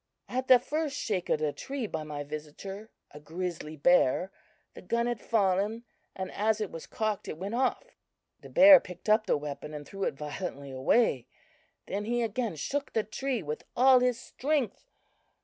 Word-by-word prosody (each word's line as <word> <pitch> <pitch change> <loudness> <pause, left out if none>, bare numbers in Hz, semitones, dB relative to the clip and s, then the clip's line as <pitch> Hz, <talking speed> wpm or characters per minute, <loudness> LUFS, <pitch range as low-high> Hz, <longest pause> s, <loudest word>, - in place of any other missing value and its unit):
At 255 +1 -3
the 255 - +9
first 290 +3 -3
shake 190 -5 -2
of - - +2
the 150 -2 0
tree 270 -3 -4
by 160 -6 -4
my 150 -1 -5
visitor, 155 +8 -8 0.2
a 150 - -11
grizzly 160 0 -5
bear, 175 +3 +3 0.4
the - - -11
gun 235 +5 0
had 240 -3 -2
fallen, 210 +1 +1 0.3
and 190 -1 -5
as 220 +1 +1
it 210 -3 -3
was 165 - -8
cocked, 215 -3 -2
it - - -5
went 195 +5 -5
off. 265 - -1 0.4
"The - - -13
bear 285 0 +9
picked 180 +1 -9
up 215 +1 +4
the - - +3
weapon 150 +1 -6
and 145 -1 -7
threw 195 -1 -4
it - - -1
violently 145 -1 -6
away; 130 - +2 0.6
then 205 +2 -3
he 240 +1 0
again 225 -3 -2
shook 280 - -3
the 220 - +1
tree 245 +1 -3
with 150 0 -5
all 260 +1 +7
his 250 -1 +1
strength. 270 -3 -2
205 Hz, 180 wpm, -29 LUFS, 155-240 Hz, 0.6 s, the